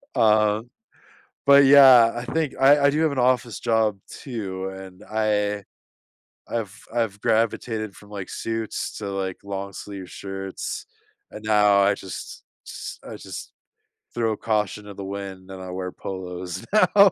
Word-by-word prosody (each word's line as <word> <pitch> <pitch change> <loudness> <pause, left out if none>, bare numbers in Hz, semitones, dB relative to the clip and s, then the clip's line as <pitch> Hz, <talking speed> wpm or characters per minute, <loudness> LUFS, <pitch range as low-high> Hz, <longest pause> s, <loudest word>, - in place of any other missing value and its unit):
Um, 110 +1 +3 0.8
but, 140 0 +8
yeah, 130 -4 +8
I 120 - -4
think 155 +2 -1
I 140 +2 +7
I - - +7
do 150 +2 0
have 160 -2 +3
an 140 - -2
office 125 -2 +1
job 110 -3 +1
too, 95 -7 -5
and 95 0 -10
I 105 -2 0 0.9
I've 110 -5 -3 0.2
I've 110 -4 -1
gravitated 110 -2 0
from, 105 - -16
like, 100 -3 -6
suits 115 -1 -4
to, 105 - -5
like, 95 -1 -3
long 100 0 -5
sleeve 95 -3 -8
shirts, 95 -1 -5 0.5
and 105 - -9
now 105 -2 +4
I 100 +1 +4
just 95 -2 -8 0.2
just - - -7
I - - -7
just - - -8 0.6
throw 115 -2 0
caution 105 -2 -1
to 105 - -9
the 100 - -7
wind 95 -1 -7
and 95 0 -8
I 95 - -7
wear 90 0 -4
polos 90 -2 -6
now. 205 -2 +6
105 Hz, 150 wpm, -24 LUFS, 95-115 Hz, 0.9 s, but